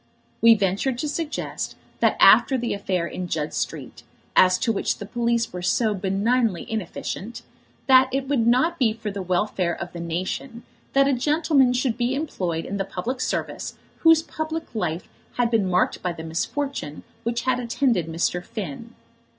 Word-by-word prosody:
We 230 Hz, 0 st, +8 dB
ventured 205 Hz, +6 st, 0 dB
to 300 Hz, -, -2 dB
suggest 305 Hz, +1 st, -3 dB, 0.3 s
after 265 Hz, -, +6 dB
that 240 Hz, -1 st, -2 dB
affair 190 Hz, -4 st, -1 dB
in 180 Hz, +1 st, -5 dB
Judd 155 Hz, -2 st, -2 dB
Street, 135 Hz, -6 st, -4 dB, 0.3 s
as 185 Hz, 0 st, +6 dB
to 230 Hz, -, 0 dB
which 205 Hz, -, -1 dB
the 205 Hz, -, -7 dB
police 235 Hz, 0 st, 0 dB
were 180 Hz, -, -5 dB
so 215 Hz, +4 st, +1 dB
benignly 200 Hz, +1 st, 0 dB
inefficient, 220 Hz, +1 st, -5 dB, 0.4 s
that 260 Hz, -1 st, +6 dB
it 270 Hz, 0 st, -1 dB
would 255 Hz, -5 st, +1 dB
not 315 Hz, +8 st, +3 dB
be 230 Hz, -5 st, +3 dB
for 220 Hz, -2 st, -5 dB
the 200 Hz, 0 st, -5 dB
welfare 180 Hz, -1 st, 0 dB
of 175 Hz, +1 st, -7 dB
the 170 Hz, -, -6 dB
nation 185 Hz, +9 st, -4 dB, 0.3 s
that 275 Hz, 0 st, +5 dB
a 280 Hz, -, +3 dB
gentleman 295 Hz, 0 st, +3 dB
should 250 Hz, -2 st, 0 dB
be 245 Hz, +2 st, +1 dB
employed 180 Hz, -, -2 dB
in 200 Hz, -, -4 dB
the 195 Hz, -, 0 dB
public 215 Hz, +7 st, -4 dB
service -, -, -3 dB, 0.2 s
whose 325 Hz, -1 st, +5 dB
public 315 Hz, -1 st, -5 dB
life 175 Hz, -6 st, -2 dB, 0.3 s
had 240 Hz, -1 st, +1 dB
been 210 Hz, -5 st, +2 dB
marked 180 Hz, +1 st, +1 dB
by 180 Hz, -1 st, -2 dB
the 160 Hz, -, -8 dB
misfortune 165 Hz, -, -3 dB, 0.2 s
which 235 Hz, 0 st, -2 dB
had 255 Hz, -1 st, +1 dB
attended 235 Hz, -, 0 dB
Mr. 170 Hz, +2 st, -1 dB
Finn. 215 Hz, -, -7 dB
225 Hz, 165 wpm, -24 LUFS, 180-255 Hz, 0.4 s, We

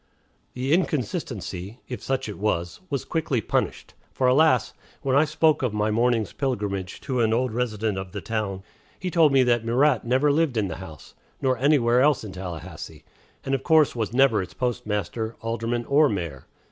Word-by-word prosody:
The 130 Hz, +4 st, 0 dB
inconsistency, 115 Hz, -, -2 dB
if 125 Hz, -, -6 dB
such 135 Hz, -2 st, -2 dB
it 105 Hz, -, -7 dB
was, 90 Hz, -5 st, -1 dB
was 140 Hz, -4 st, -2 dB
quickly 155 Hz, -6 st, -1 dB
punished. 105 Hz, -, -2 dB, 0.2 s
For, 130 Hz, -, -1 dB
alas! 130 Hz, -2 st, +4 dB, 0.3 s
when 135 Hz, -1 st, +1 dB
I 145 Hz, +3 st, +5 dB
spoke 155 Hz, 0 st, +2 dB
of 125 Hz, -5 st, -1 dB
my 105 Hz, +1 st, +1 dB
morning's 115 Hz, -2 st, +1 dB
pilgrimage 100 Hz, -8 st, -3 dB
to 130 Hz, -3 st, -2 dB
an 110 Hz, -1 st, +2 dB
old 125 Hz, -1 st, 0 dB
resident 110 Hz, -4 st, -1 dB
of 95 Hz, -1 st, -7 dB
the 100 Hz, -, -5 dB
town, 100 Hz, -3 st, -3 dB, 0.4 s
he 185 Hz, -1 st, -3 dB
told 160 Hz, -3 st, +5 dB
me 135 Hz, -1 st, +5 dB
that 120 Hz, -2 st, +2 dB
Murat 125 Hz, +2 st, +2 dB
never 130 Hz, +5 st, +2 dB
lived 145 Hz, -4 st, +1 dB
in 100 Hz, -3 st, 0 dB
the 80 Hz, -, -5 dB
house, 80 Hz, -6 st, -11 dB, 0.3 s
nor 130 Hz, -1 st, +1 dB
anywhere 125 Hz, -3 st, +4 dB
else 145 Hz, -2 st, +3 dB
in 105 Hz, -, -7 dB
Tallahassee, 90 Hz, -3 st, -8 dB, 0.4 s
and 135 Hz, -, -1 dB
of 135 Hz, -, 0 dB
course 155 Hz, -3 st, +4 dB
was 110 Hz, -3 st, -2 dB
never 125 Hz, -4 st, +4 dB
its 90 Hz, -, -8 dB
postmaster, 110 Hz, -3 st, -2 dB
alderman, 115 Hz, +1 st, -2 dB
or 145 Hz, +3 st, +4 dB
mayor. 85 Hz, -, -4 dB
120 Hz, 180 wpm, -25 LUFS, 105-135 Hz, 0.4 s, I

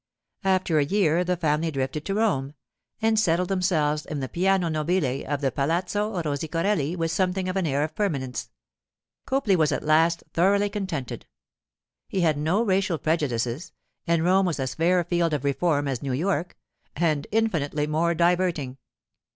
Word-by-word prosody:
After 185 Hz, -4 st, +2 dB
a -, -, +4 dB
year 175 Hz, 0 st, +2 dB
the 180 Hz, 0 st, -1 dB
family 160 Hz, 0 st, 0 dB
drifted 135 Hz, +1 st, -3 dB
to 195 Hz, -, -2 dB
Rome, 150 Hz, -11 st, 0 dB, 0.5 s
and 220 Hz, -1 st, +3 dB
settled 180 Hz, -3 st, +1 dB
themselves 155 Hz, -6 st, +1 dB
in 150 Hz, -, -5 dB
the 130 Hz, -, -3 dB
piano 185 Hz, +3 st, +1 dB
nobile 155 Hz, -4 st, 0 dB
of 145 Hz, -1 st, -2 dB
the 135 Hz, -2 st, +1 dB
Palazzo 180 Hz, -, -1 dB
Rosicorelli 160 Hz, +2 st, -1 dB
with 165 Hz, -2 st, -1 dB
something 185 Hz, 0 st, 0 dB
of 185 Hz, -, -2 dB
an 190 Hz, -4 st, 0 dB
air 140 Hz, 0 st, +1 dB
of 155 Hz, +1 st, -4 dB
permanence. 135 Hz, -, -2 dB, 0.8 s
Copley 265 Hz, -8 st, +2 dB
was 155 Hz, -4 st, +2 dB
at -, -, -2 dB
last 165 Hz, +2 st, +3 dB
thoroughly 200 Hz, +4 st, +2 dB
contented; 185 Hz, -, -4 dB, 0.8 s
he 190 Hz, -, -1 dB
had 160 Hz, -3 st, +3 dB
no 175 Hz, +9 st, +1 dB
racial 190 Hz, -4 st, +1 dB
prejudices, 145 Hz, -1 st, -1 dB, 0.3 s
and 165 Hz, -1 st, +2 dB
Rome 190 Hz, +2 st, +3 dB
was 165 Hz, -4 st, -2 dB
as 130 Hz, -1 st, -2 dB
fair 175 Hz, +5 st, +2 dB
a -, -, -3 dB
field 170 Hz, -1 st, 0 dB
of 145 Hz, -, -4 dB
reform 145 Hz, +1 st, +1 dB
as 130 Hz, -3 st, -2 dB
New 135 Hz, -2 st, -2 dB
York—and 150 Hz, -, -2 dB
infinitely 160 Hz, -10 st, 0 dB
more 165 Hz, +3 st, +1 dB
diverting. 170 Hz, -6 st, +1 dB
165 Hz, 160 wpm, -25 LUFS, 145-185 Hz, 0.8 s, a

